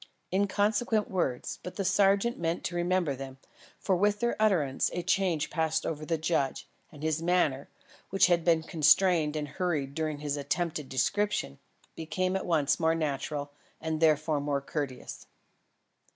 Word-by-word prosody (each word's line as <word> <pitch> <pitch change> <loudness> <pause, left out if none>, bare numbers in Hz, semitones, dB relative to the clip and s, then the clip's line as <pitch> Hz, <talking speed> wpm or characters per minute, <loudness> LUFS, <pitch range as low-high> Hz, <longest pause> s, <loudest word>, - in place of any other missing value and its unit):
Inconsequent 210 +3 +1
words, 155 -10 -2
but 180 - -8
the 195 - -2
sergeant 200 +4 +3
meant 165 0 -1
to 175 - -3
remember 175 -4 +1
them, 135 0 -8 0.4
for 190 - 0
with 205 +3 +2
their 235 +1 0
utterance, 160 -11 +2
a 175 - -3
change 175 -6 0
passed 160 -2 0
over 155 -1 -4
the 165 - +1
judge; 155 -4 -1 0.2
and 150 0 -12
his 160 0 0
manner, 165 -6 +1 0.4
which 195 - +4
had 175 -2 +2
been 165 -2 +3
constrained 155 0 +3
and 150 -1 -2
hurried 150 -5 -2
during 155 -1 -2
his 145 0 -3
attempted 150 0 -2
description, 205 - 0 0.4
became 185 +3 -2
at 190 - -2
once 150 -4 +2
more 160 0 +2
natural, 145 -1 -3 0.3
and 160 -1 -2
therefore 155 -1 +2
more 145 -1 0
courteous. 140 -2 -5
160 Hz, 150 wpm, -29 LUFS, 145-185 Hz, 0.4 s, which